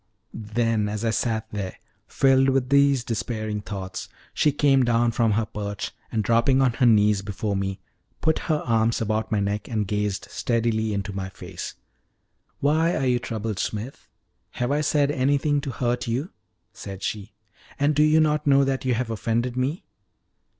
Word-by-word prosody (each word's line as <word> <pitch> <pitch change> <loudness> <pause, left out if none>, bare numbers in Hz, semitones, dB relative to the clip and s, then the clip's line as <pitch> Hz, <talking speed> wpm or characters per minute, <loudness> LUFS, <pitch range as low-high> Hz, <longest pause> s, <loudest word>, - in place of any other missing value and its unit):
Then, 110 -1 -1
as 105 +2 -3
I 115 - +2
sat 110 -1 -1
there, 100 -3 -4 0.3
filled 135 0 +3
with 130 -1 +1
these 140 -2 +4
despairing 110 -2 -3
thoughts, 95 -2 -6 0.2
she 150 - +3
came 135 -2 +3
down 120 0 +2
from 115 -2 +2
her 110 +1 +1
perch, 105 -1 -5 0.2
and, 110 -2 0
dropping 115 +5 +3
on 130 -3 +3
her 125 +1 +3
knees 105 -3 +4
before 100 +1 -3
me, 95 0 -2 0.4
put 160 0 +1
her 155 -1 +1
arms 115 -1 +2
about 110 0 -1
my 105 - +2
neck 100 +1 -2
and 110 -3 -1
gazed 105 -1 -1
steadily 115 -2 0
into 100 0 -3
my 95 0 -4
face. - - -8 0.9
"Why 160 +4 +2
are 135 - 0
you 125 -1 +2
troubled, 110 -4 -4
Smith 110 +9 -4 0.5
have 125 +2 -1
I 145 +1 +2
said 145 -1 +2
anything 145 +2 +1
to 140 - -5
hurt 120 -1 -1
you?" 130 +9 -2 0.4
said 95 -1 -8
she. 105 -1 -4 0.4
"And 145 +2 +2
do 150 - +2
you 155 +1 +5
not 150 -1 +1
know 140 0 +5
that 135 -1 -1
you 125 -2 +2
have 115 -1 -2
offended 115 +2 -1
me?" 130 +6 -2
115 Hz, 170 wpm, -24 LUFS, 105-135 Hz, 0.9 s, you